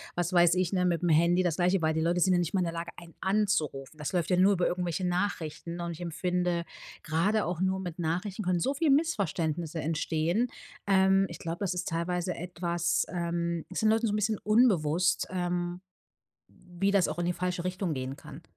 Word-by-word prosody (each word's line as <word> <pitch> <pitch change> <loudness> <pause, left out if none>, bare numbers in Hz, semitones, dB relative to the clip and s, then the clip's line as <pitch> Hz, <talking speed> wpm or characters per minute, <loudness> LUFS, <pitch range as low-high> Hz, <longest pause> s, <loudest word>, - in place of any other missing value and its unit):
was 175 +1 -1
weiß 175 -1 +5
ich, 185 -1 0
ne, 180 -2 +1
mitm 175 0 +1
Handy 170 +3 +4
das 170 -3 0
Gleiche, 180 0 +2
weil 160 0 +2
die 160 - -1
Leute 170 +2 +1
sind 185 - +4
ja 175 - +3
nicht 175 +1 -2
mal 190 - +2
in - - +2
der 165 - -3
Lage, 170 +1 -5
einen 170 -1 -13
anzurufen. 160 -9 0
Das 150 +4 -4
läuft 175 -1 0
ja 180 - +3
nur 195 +2 +5
über 180 -2 +1
irgendwelche 180 0 -1
Nachrichten. 175 -2 -2
Und 170 0 -3
ich 165 - -8
empfinde, 175 +1 -1 0.4
grade 195 +7 +1
auch 175 -1 -3
nur 190 0 +1
mit 175 -1 -6
Nachrichten 180 +5 -2
können 180 -1 +1
so 270 - +1
viel 290 0 +2
Missverständnisse 170 - 0
entstehen. 165 +7 0 0.4
Ähm, 195 0 +4
ich 170 - -8
glaub, 165 +1 -5
das 190 -3 -1
ist 180 0 -3
teilweise 175 +2 -1
etwas, 175 -1 -1
ähm 170 -1 -2
ist 185 - -3
den 215 - +4
Leuten 225 +1 +2
so 205 - -1
'n - - +1
bisschen 215 0 0
unbewusst, 180 -7 +2
ähm, 175 0 -2 0.7
wie 180 +3 -3
das 195 -3 +3
auch - - -4
in 175 - 0
die 175 - +1
falsche 180 0 -3
Richtung 185 -3 -2
gehen 130 +1 -4
kann. - - -11
175 Hz, 210 wpm, -29 LUFS, 170-190 Hz, 0.7 s, weiß